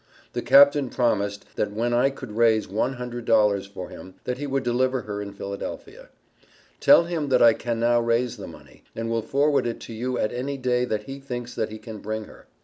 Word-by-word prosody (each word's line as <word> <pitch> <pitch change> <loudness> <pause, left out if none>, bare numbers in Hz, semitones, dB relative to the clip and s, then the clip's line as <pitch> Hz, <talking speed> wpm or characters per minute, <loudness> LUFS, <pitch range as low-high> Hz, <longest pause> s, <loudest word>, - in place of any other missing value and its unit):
The - - -2
Capt. 140 +1 +7
promised, 100 -5 0
that 105 - 0
when 115 +3 -1
I 125 +3 +4
could 135 -5 -9
raise 110 0 +3
one 110 +7 -1
hundred 125 -1 -6
dollars 105 -3 +3
for 95 -2 -8
him 95 0 -11
that 125 +1 -3
he 145 - -3
would 135 -1 -1
deliver 130 +1 +1
her 105 -2 -5
in 100 0 -6
Philadelphia. 400 - -7 0.7
Tell 280 - +7
him 165 -4 -3
that 125 -2 +4
I 115 -1 +8
can 115 0 -3
now 120 +1 +3
raise 115 +1 0
the - - -8
money, - - -15
and 115 0 -3
will 115 0 0
forward 140 +3 +1
it 115 - -4
to 115 - -8
you 125 +3 -2
at 110 - -1
any 135 +3 -3
day 125 -1 +1
that 110 -3 -2
he 135 +4 -8
thinks 120 -3 -6
that 110 - -2
he 110 - -7
can 110 0 -9
bring 110 +1 -4
her. - - -16
120 Hz, 220 wpm, -24 LUFS, 110-130 Hz, 0.7 s, I